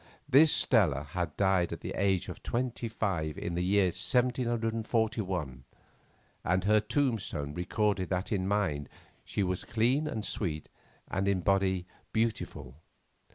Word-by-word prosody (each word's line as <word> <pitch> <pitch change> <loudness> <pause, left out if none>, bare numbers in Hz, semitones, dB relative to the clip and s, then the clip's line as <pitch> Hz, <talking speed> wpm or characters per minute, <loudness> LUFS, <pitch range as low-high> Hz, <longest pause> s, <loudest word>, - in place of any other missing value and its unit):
This 145 +3 +6
Stella 85 - +3
had 85 -4 -3
died 95 -3 +2
at - - -5
the - - -5
age 95 -1 +1
of - - -8
twenty 120 -1 -2
five 95 -9 -2
in 85 - -3
the 90 +1 0
year 95 0 +3
1741, 115 - 0 0.8
and 90 +2 +1
her 105 +2 +5
tombstone 105 - -1
recorded 95 +2 0
that 95 +1 -2
in 95 -3 0
mind 80 -9 0 0.3
she 100 - -2
was 90 -1 -1
clean 125 +7 +1
and 110 -8 -3
sweet, 80 -7 -3 0.4
and 95 0 -1
in 100 -2 +2
body 95 -2 +1 0.3
beautiful. 90 - -2
100 Hz, 135 wpm, -30 LUFS, 90-115 Hz, 0.8 s, This